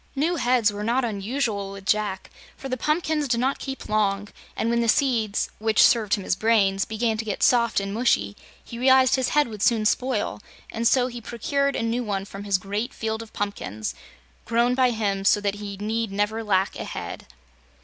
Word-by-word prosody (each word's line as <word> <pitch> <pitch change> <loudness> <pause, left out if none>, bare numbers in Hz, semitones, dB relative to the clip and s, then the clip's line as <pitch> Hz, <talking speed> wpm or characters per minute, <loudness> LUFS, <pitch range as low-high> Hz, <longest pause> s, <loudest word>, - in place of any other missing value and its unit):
New 325 +5 0
heads 245 -5 +2
were 205 +1 -5
not 240 +4 +1
unusual 210 -1 -2
with 195 -1 -10
Jack, 205 -2 -1 0.3
for 270 - -7
the 255 - -1
pumpkins 305 +2 0
did 235 -2 +1
not 265 +3 0
keep 270 -1 -6
long, 205 -1 0 0.3
and 230 - 0
when 235 0 +2
the 230 - 0
seeds 230 -7 +1
which 220 0 +4
served 220 -3 +4
him 200 - -7
as - - +1
brains 195 -3 +2
began 220 0 -1
to 225 - -2
get 210 -3 -3
soft 235 -3 +3
and 195 0 -4
mushy, 100 - +1 0.3
he 235 - -9
realized 260 0 +5
his 260 -2 0
head 295 -2 +3
would 215 -3 -8
soon 220 -1 +2
spoil, 255 +4 0 0.3
and 230 +1 0
so 250 0 +4
he 240 -1 -6
procured 280 +5 -1
a - - -1
new 230 +2 -1
one 195 -3 -3
from 200 0 -9
his 200 -2 +2
great 205 +5 -4
field 220 0 -3
of 225 - -11
pumpkins 110 - -4 0.5
grown 235 +2 +2
by 255 0 +3
him 205 -4 -1
so 205 - +4
that 200 -1 -1
he 200 -1 -6
need 220 +1 -2
never 210 +3 -1
lack 195 -2 +1
a - - -4
head. - - -7
225 Hz, 200 wpm, -24 LUFS, 205-245 Hz, 0.5 s, realized